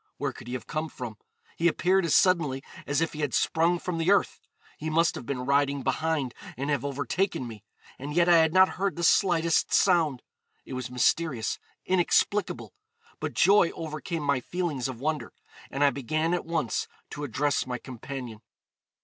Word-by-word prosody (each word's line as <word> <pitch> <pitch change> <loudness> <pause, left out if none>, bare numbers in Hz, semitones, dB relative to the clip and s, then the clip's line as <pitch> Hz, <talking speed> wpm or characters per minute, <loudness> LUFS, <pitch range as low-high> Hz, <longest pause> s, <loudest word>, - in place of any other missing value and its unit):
Where - - -2
could - - -12
he 125 - -5
have 125 - -6
come 155 +1 -3
from? 120 -6 -7 0.4
He 170 - +2
appeared 185 +2 +2
as 165 - +2
suddenly 155 -8 +3 0.2
as 145 +2 +1
if 165 - 0
he 150 - -7
had 145 -4 -1
sprung 170 +2 +2
from 170 -1 -4
the 165 +2 +1
earth; 200 - +2 0.4
he 155 - -3
must 165 +2 +3
have 120 - -8
been 125 -2 -3
riding 140 0 +2
behind 155 -6 -1 0.2
and 140 +3 -2
have 140 -3 0
overtaken 140 - -1
me, 110 -3 -10 0.4
and 140 +3 -5
yet 175 0 +4
I 175 -1 +7
had 160 -1 +4
not 185 +2 +6
heard 195 0 0
the 170 - -4
slightest 170 -2 +3
sound. 160 - +3 0.4
It - - -8
was 130 -1 -4
mysterious, 125 0 0 0.3
inexplicable; 185 - +1 0.5
but - - -4
joy 195 -3 +5
overcame 160 0 -4
my 140 -2 +2
feelings 150 -2 -2
of 130 -3 -6
wonder, 155 +1 -2 0.4
and 140 - -1
I 140 - +5
began 155 +5 -1
at 180 - -1
once 160 -8 -1 0.2
to 145 - -6
address 140 +1 0
my 125 -1 -2
companion. 125 -3 -8
155 Hz, 180 wpm, -27 LUFS, 130-170 Hz, 0.5 s, I